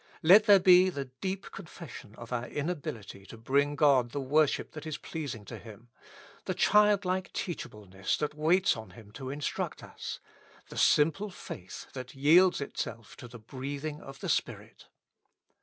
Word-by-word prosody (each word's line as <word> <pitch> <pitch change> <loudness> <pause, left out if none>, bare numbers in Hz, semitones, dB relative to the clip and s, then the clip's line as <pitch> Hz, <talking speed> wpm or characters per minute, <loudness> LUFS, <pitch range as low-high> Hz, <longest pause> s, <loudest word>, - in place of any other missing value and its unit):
Let 195 +6 +8
there 205 -2 +8
be 180 0 +6
the 140 -6 -4
deep 185 +10 -6
con - - -9
fession 145 -11 -11
of 120 +1 -9
our 120 0 -2
inability 140 - -5
to 115 - -11
bring 140 +5 +1
God 140 -5 +4
the 140 - -4
worship 145 +2 +1
that 155 0 -8
is 155 -2 -4
pleasing 140 -10 -6
to - - -8
Him; 115 +1 -13 0.6
the - - -2
childlike 200 -3 +3
teachableness 105 - -4
that 150 -1 -2
waits 165 +5 +3
on 110 -1 -9
Him 105 -3 -14
to 130 +3 -7
instruct 145 +1 -4
us; - - -7 0.5
the - - -9
simple 165 +8 +3
faith 95 - -9
that 130 -1 -8
yields 165 +6 +5
itself 115 -5 -6
to 125 - -10
the 120 0 -11
breathing 140 +6 -6
of 135 0 -11
the - - -4
Spirit. - - -3
145 Hz, 160 wpm, -30 LUFS, 120-170 Hz, 0.6 s, Let